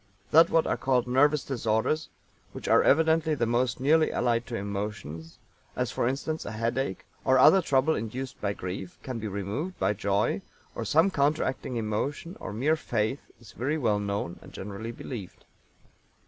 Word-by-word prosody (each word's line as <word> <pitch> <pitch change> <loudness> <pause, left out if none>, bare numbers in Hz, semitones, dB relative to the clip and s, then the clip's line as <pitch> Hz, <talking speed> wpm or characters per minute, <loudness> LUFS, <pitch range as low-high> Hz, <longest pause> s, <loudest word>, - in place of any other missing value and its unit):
That 165 +2 +7
what 165 -1 +3
are - - 0
called 130 -2 +1
nervous 145 +4 +3
disorders, 120 +4 0 0.4
which - - -7
are - - +6
evidently 160 +1 +3
the 120 - 0
most 120 +2 0
nearly 155 +4 +4
allied 120 -1 0
to 120 - -4
emotions 100 -6 -5 0.4
as, - - -1
for - - 0
instance, 140 +5 -2
a - - -6
headache, 115 -1 -2 0.2
or 130 0 +4
other 190 +9 +7
trouble 140 -1 +2
induced 125 +3 -5
by 100 -1 0
grief 90 -1 -6
can 130 -3 -4
be 110 - -4
removed 105 - -4
by 95 +2 +1
joy, 100 0 0 0.3
or 115 - -4
some 160 - +4
counteracting 140 -4 0
emotion 120 - -2
or - - -6
mere 135 +9 +2
faith 120 -3 -1 0.2
is 110 -3 -14
very 145 +6 -1
well 110 -8 +1
known 100 -4 -3
and - - -14
generally 105 +3 -6
believed. 115 -5 -8
120 Hz, 165 wpm, -28 LUFS, 105-145 Hz, 0.4 s, That